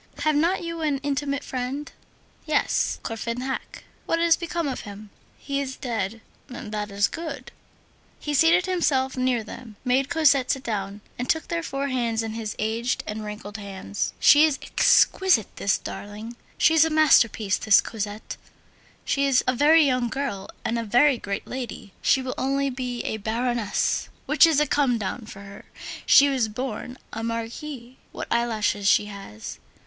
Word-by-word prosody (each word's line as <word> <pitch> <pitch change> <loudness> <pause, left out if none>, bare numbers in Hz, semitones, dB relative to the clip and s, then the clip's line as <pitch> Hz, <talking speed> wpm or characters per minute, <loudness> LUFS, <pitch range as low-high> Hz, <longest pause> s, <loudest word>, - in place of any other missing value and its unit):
"Have 310 0 +3
not 340 +5 +2
you 335 -1 -5
an 295 -3 +1
intimate 285 0 -1
friend?" 260 +3 -4 0.6
"Yes, 305 -1 +1
Courfeyrac." 235 +3 -4 0.2
"What 330 - +1
has 335 0 +4
become 340 -2 -3
of 265 - -3
him?" 205 0 -10 0.3
"He 280 -1 -3
is 265 -1 -4
dead." 225 -4 -3 0.3
"That 210 -4 -5
is 200 0 +2
good." 320 -3 -7 0.7
He 295 - -3
seated 330 +5 +4
himself 285 -8 +1
near 255 -3 +1
them, 220 0 -10
made 260 +2 +2
Cosette 285 -6 +3
sit 270 -1 0
down, 205 -2 -4 0.2
and 245 - -3
took 320 - 0
their 335 0 -1
four 280 -3 -3
hands 235 -3 0
in 220 -1 -4
his 220 -2 -4
aged 225 +3 -1
and 215 +1 -5
wrinkled 210 0 -7
hands: 200 0 -4
"She 295 +1 +7
is 310 -3 +3
exquisite, 370 - +3
this 200 - +1
darling. 210 +3 -8 0.2
She's 320 -1 +5
a 320 - +1
masterpiece, 235 -10 +4
this 215 -3 +5
Cosette! 210 -1 -5 0.7
She 280 0 +1
is 265 -2 +3
a 255 - +2
very 300 +4 +5
little 255 -3 +1
girl 260 -8 -4 0.2
and 235 +1 0
a - - -2
very 245 +4 +4
great 200 0 -4
lady. 240 -6 -7
She 265 - +3
will 255 -1 -3
only 275 +1 0
be 250 -1 -4
a 220 - -2
Baroness, 230 +1 -1 0.2
which 300 +3 +6
is 315 -3 +3
a 300 - +3
come 270 -4 +2
down 215 +2 -4
for 200 - -10
her; 200 0 -12 0.4
she 280 +1 +8
was 260 -5 +1
born 250 +2 -5 0.2
a 225 - -4
Marquise. 235 +3 -5
What - - -6
eyelashes 220 -4 0
she 205 - +4
has! 195 - -9
250 Hz, 165 wpm, -25 LUFS, 220-285 Hz, 0.7 s, she